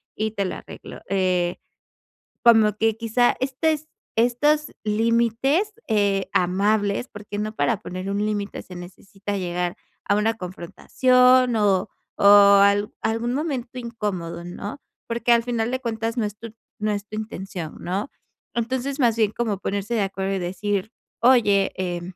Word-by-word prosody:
y 215 Hz, 0 st, -1 dB
te 200 Hz, -2 st, -2 dB
lo 185 Hz, -, -3 dB
arreglo". -, -, -10 dB
Eh, 185 Hz, -2 st, +1 dB, 0.9 s
como 225 Hz, -3 st, +6 dB
que, 225 Hz, 0 st, +2 dB
quizá, 230 Hz, +2 st, +2 dB
este, 265 Hz, +4 st, 0 dB
es 310 Hz, 0 st, -6 dB, 0.3 s
estos 295 Hz, +6 st, +2 dB
límites, 230 Hz, -, +1 dB
eh, 200 Hz, -3 st, +1 dB
amables. 200 Hz, +5 st, +1 dB
Porque 205 Hz, 0 st, -8 dB
no 215 Hz, +1 st, -3 dB
para 225 Hz, -3 st, 0 dB
poner 185 Hz, +2 st, -6 dB
un 200 Hz, +1 st, -1 dB
límite, 205 Hz, -1 st, -3 dB
se 180 Hz, -, -12 dB
necesita 195 Hz, +3 st, -7 dB
llegar 180 Hz, -1 st, -2 dB, 0.3 s
a 200 Hz, -, +3 dB
una 220 Hz, +2 st, +1 dB
confrontación, 250 Hz, +7 st, +2 dB
o 200 Hz, -2 st, +2 dB, 0.3 s
o -, -, 0 dB, 0.4 s
al 200 Hz, +1 st, +3 dB
algún 230 Hz, +2 st, -1 dB
momento 265 Hz, -4 st, -3 dB
incómodo, 195 Hz, -8 st, -4 dB
¿no? 200 Hz, +8 st, -7 dB, 0.3 s
Porque 235 Hz, +1 st, 0 dB
al 235 Hz, 0 st, +3 dB
final 235 Hz, -1 st, -1 dB
de 260 Hz, -, -1 dB
cuentas 230 Hz, -1 st, -3 dB
no 230 Hz, -, +1 dB
es 205 Hz, 0 st, -6 dB
tu 230 Hz, 0 st, -9 dB, 0.3 s
no 210 Hz, 0 st, 0 dB
es 205 Hz, 0 st, -4 dB
tu 215 Hz, -, -8 dB
intención, 190 Hz, -6 st, -6 dB
¿no? 195 Hz, +8 st, -3 dB, 0.4 s
Entonces, 260 Hz, +4 st, -2 dB
más 235 Hz, -4 st, +3 dB
bien 215 Hz, -2 st, +2 dB
como 220 Hz, -3 st, -2 dB
ponerse 200 Hz, +4 st, -2 dB
de 220 Hz, -, +1 dB
acuerdo 195 Hz, 0 st, -2 dB
y -, -, -2 dB
decir: 195 Hz, +3 st, -2 dB, 0.3 s
"Oye, 215 Hz, -6 st, +4 dB
eh, 175 Hz, -2 st, -2 dB
215 Hz, 155 wpm, -23 LUFS, 195-235 Hz, 0.9 s, como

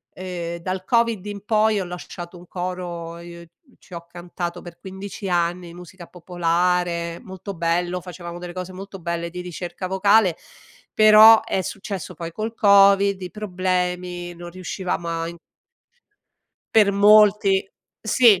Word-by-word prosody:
ehm 180 Hz, -2 st, -5 dB
dal 185 Hz, +1 st, -4 dB
Covid 230 Hz, -4 st, +1 dB
in 205 Hz, -1 st, -7 dB
poi 215 Hz, -1 st, +2 dB
ho -, -, -2 dB
lasciato 175 Hz, 0 st, -8 dB
un 175 Hz, +1 st, -15 dB
coro, 175 Hz, -2 st, -5 dB
i 170 Hz, -1 st, -11 dB, 0.3 s
ci 185 Hz, -, -17 dB
ho 170 Hz, 0 st, -7 dB
cantato 175 Hz, 0 st, -6 dB
per 175 Hz, -1 st, -11 dB
15 195 Hz, +1 st, -7 dB
anni, 175 Hz, 0 st, -1 dB
musica 180 Hz, +1 st, -12 dB
popolare, 175 Hz, -1 st, -1 dB
molto 190 Hz, -1 st, -8 dB
bello, 175 Hz, +1 st, -1 dB
facevamo 175 Hz, -1 st, -8 dB
delle 175 Hz, 0 st, -8 dB
cose 185 Hz, 0 st, -6 dB
molto 195 Hz, +1 st, -9 dB
belle 170 Hz, 0 st, -3 dB
di 180 Hz, +1 st, -8 dB
ricerca 180 Hz, +1 st, -6 dB
vocale, 190 Hz, -1 st, +3 dB, 0.6 s
però 215 Hz, +1 st, +8 dB
è 190 Hz, -, -1 dB
successo 190 Hz, -1 st, -6 dB
poi 165 Hz, +1 st, -7 dB
col 220 Hz, +5 st, -4 dB
Covid, 200 Hz, -2 st, +5 dB
i 180 Hz, -, -6 dB
problemi, 180 Hz, -3 st, -2 dB
non 175 Hz, 0 st, -9 dB
riuscivamo 180 Hz, -1 st, -4 dB
a 165 Hz, 0 st, -2 dB
in 170 Hz, 0 st, -9 dB, 1.4 s
Per 210 Hz, -2 st, +6 dB
molti 205 Hz, -1 st, +5 dB, 0.3 s
Sì. 220 Hz, -3 st, +5 dB
180 Hz, 140 wpm, -22 LUFS, 175-200 Hz, 1.4 s, però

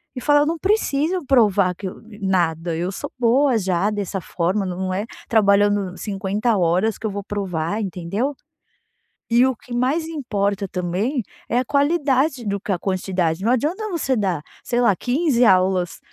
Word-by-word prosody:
e 250 Hz, -, -5 dB
falar: 290 Hz, +2 st, +4 dB
"Eu -, -, +3 dB
não 325 Hz, +2 st, -2 dB
preciso 360 Hz, -4 st, 0 dB
provar 210 Hz, -8 st, +3 dB
que 190 Hz, +2 st, -6 dB
eu 185 Hz, -, -8 dB, 0.2 s
nada, 170 Hz, -3 st, 0 dB
eu 175 Hz, +3 st, -2 dB
sou -, -, -6 dB
boa 250 Hz, +2 st, +3 dB
já 190 Hz, -1 st, +1 dB
dessa 200 Hz, -2 st, -3 dB
forma. 185 Hz, +4 st, -1 dB
Não 185 Hz, +1 st, -3 dB
é 200 Hz, +3 st, -2 dB, 0.2 s
trabalhando 200 Hz, -3 st, +3 dB
50 205 Hz, +3 st, -1 dB
horas 185 Hz, +4 st, +1 dB
que 220 Hz, -, -2 dB
eu -, -, -3 dB
vou 200 Hz, 0 st, -5 dB
provar", 195 Hz, -1 st, -2 dB
entendeu? 195 Hz, -, -2 dB, 0.9 s
E 235 Hz, +1 st, +4 dB
o 260 Hz, -, -1 dB
que 240 Hz, -, -11 dB
mais 270 Hz, +7 st, 0 dB
importa 205 Hz, -10 st, -2 dB
também 190 Hz, -, -2 dB, 0.3 s
é 235 Hz, -, +1 dB
a 255 Hz, -, +1 dB
qualidade 280 Hz, -2 st, +1 dB
do 200 Hz, -1 st, -1 dB
que 205 Hz, -, -3 dB
a 185 Hz, -, +1 dB
quantidade. 185 Hz, -2 st, -1 dB
Não 230 Hz, -, +2 dB
adianta 330 Hz, -, 0 dB
você 320 Hz, -8 st, 0 dB
dar, 185 Hz, -8 st, -1 dB, 0.2 s
sei 240 Hz, -, -1 dB
lá 235 Hz, -5 st, +4 dB
15 255 Hz, -, +1 dB
aulas, 185 Hz, -4 st, +3 dB
205 Hz, 170 wpm, -21 LUFS, 185-255 Hz, 0.9 s, falar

